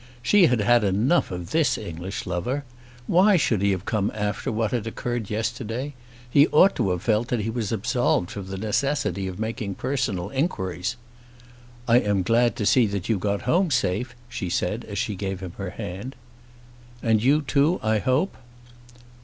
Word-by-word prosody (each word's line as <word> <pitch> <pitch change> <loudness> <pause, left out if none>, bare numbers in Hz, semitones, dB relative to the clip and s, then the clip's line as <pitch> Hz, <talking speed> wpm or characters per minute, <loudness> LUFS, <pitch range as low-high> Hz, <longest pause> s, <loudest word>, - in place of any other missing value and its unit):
She 185 - +5
had 120 -3 +1
had 120 +2 +4
enough 105 - +2
of 90 -2 -6
this 155 -7 +2
English 90 0 -6
lover. 95 +11 -2 0.4
Why 190 - +5
should 110 - +1
he 100 - +3
have 95 0 -1
come 105 -3 0
after 105 0 -2
what 110 -1 -1
had 115 -3 -2
occurred 120 -1 -3
yesterday? 115 +5 -3 0.3
He 140 +5 +5
ought 190 +6 +5
to 95 - +1
have 90 -1 -2
felt 110 +1 +1
that 120 -3 -1
he 110 +2 -2
was 115 -3 -3
absolved 115 -4 0
from 100 -2 -6
the 95 0 -5
necessity 105 -2 -1
of 90 -1 -6
making 110 -3 -3
personal 120 -8 -2
inquiries. 95 - -2 0.9
"I 120 +1 +6
am 105 -4 0
glad 120 +5 +2
to 105 - -2
see 120 +1 +4
that 100 -1 -4
you 110 -4 +2
got 100 +1 -1
home 175 +8 +2
safe," 120 -1 0
she 105 -6 -4
said - - -1
as - - -6
she 105 - -1
gave 95 -1 -4
him 95 -3 -7
her 100 -2 -3
hand. 95 +8 -6 0.9
"And 110 -2 +3
you 145 +5 +3
too, 145 +5 +2
I 110 0 +2
hope?" 130 - +1
110 Hz, 180 wpm, -24 LUFS, 100-125 Hz, 0.9 s, I